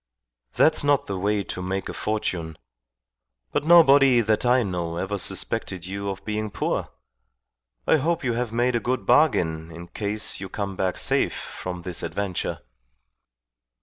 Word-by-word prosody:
"That's 155 Hz, -1 st, +4 dB
not 145 Hz, -1 st, +2 dB
the 100 Hz, -, -4 dB
way 100 Hz, +1 st, 0 dB
to 90 Hz, -, -5 dB
make 95 Hz, +1 st, -3 dB
a -, -, -5 dB
fortune. 90 Hz, -7 st, -3 dB, 0.9 s
But -, -, -1 dB
nobody 140 Hz, -7 st, +7 dB
that 110 Hz, +2 st, +1 dB
I 125 Hz, 0 st, +4 dB
know 85 Hz, -4 st, -3 dB
ever 95 Hz, +3 st, -2 dB
suspected 90 Hz, 0 st, -2 dB
you 100 Hz, +2 st, -4 dB
of 95 Hz, -, -6 dB
being 110 Hz, 0 st, -2 dB
poor. -, -, -2 dB, 1.0 s
I -, -, +4 dB
hope 165 Hz, +3 st, -1 dB
you 125 Hz, -2 st, 0 dB
have 120 Hz, -1 st, -2 dB
made 120 Hz, +2 st, +1 dB
a -, -, +2 dB
good 125 Hz, +2 st, -2 dB
bargain 80 Hz, -, +2 dB
in 85 Hz, +1 st, -10 dB
case 105 Hz, +2 st, -2 dB
you 95 Hz, -, -6 dB
come 100 Hz, -1 st, -4 dB
back 95 Hz, -1 st, -1 dB
safe -, -, +1 dB
from 90 Hz, -1 st, -7 dB
this 90 Hz, -2 st, -3 dB
adventure." 100 Hz, -3 st, -3 dB
105 Hz, 155 wpm, -24 LUFS, 90-125 Hz, 1.0 s, nobody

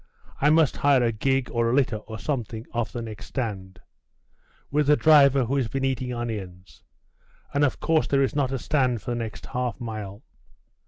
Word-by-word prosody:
I 145 Hz, -, +4 dB
must 155 Hz, -2 st, +3 dB
hire 140 Hz, -3 st, +4 dB
a 115 Hz, -, +2 dB
gig, 130 Hz, +4 st, 0 dB
or 115 Hz, -1 st, +1 dB
a 120 Hz, -, +1 dB
litter, 120 Hz, -6 st, +2 dB
or 110 Hz, +1 st, -9 dB
some 125 Hz, +3 st, -2 dB
thing, 110 Hz, +1 st, -9 dB
off 115 Hz, -3 st, -2 dB
the 120 Hz, -, -5 dB
next 110 Hz, -2 st, -8 dB
stand.... 100 Hz, -7 st, -5 dB, 0.9 s
with 150 Hz, 0 st, +1 dB
a 150 Hz, -, +7 dB
driver 140 Hz, -4 st, +5 dB
who 135 Hz, +4 st, -1 dB
has 130 Hz, -4 st, 0 dB
been 135 Hz, +2 st, -2 dB
eating 130 Hz, -1 st, -2 dB
onions.... 100 Hz, -7 st, -6 dB, 0.7 s
and 140 Hz, -, +2 dB
of 140 Hz, -, +1 dB
course 160 Hz, -1 st, +1 dB
there 140 Hz, -1 st, +2 dB
is 135 Hz, -, -1 dB
not 135 Hz, -3 st, +1 dB
a 135 Hz, -, -1 dB
stand 125 Hz, -3 st, 0 dB
for -, -, -4 dB
the -, -, -1 dB
next 115 Hz, -3 st, -6 dB
half 125 Hz, -3 st, -3 dB
mile. 110 Hz, -2 st, -6 dB
125 Hz, 200 wpm, -25 LUFS, 110-140 Hz, 0.9 s, a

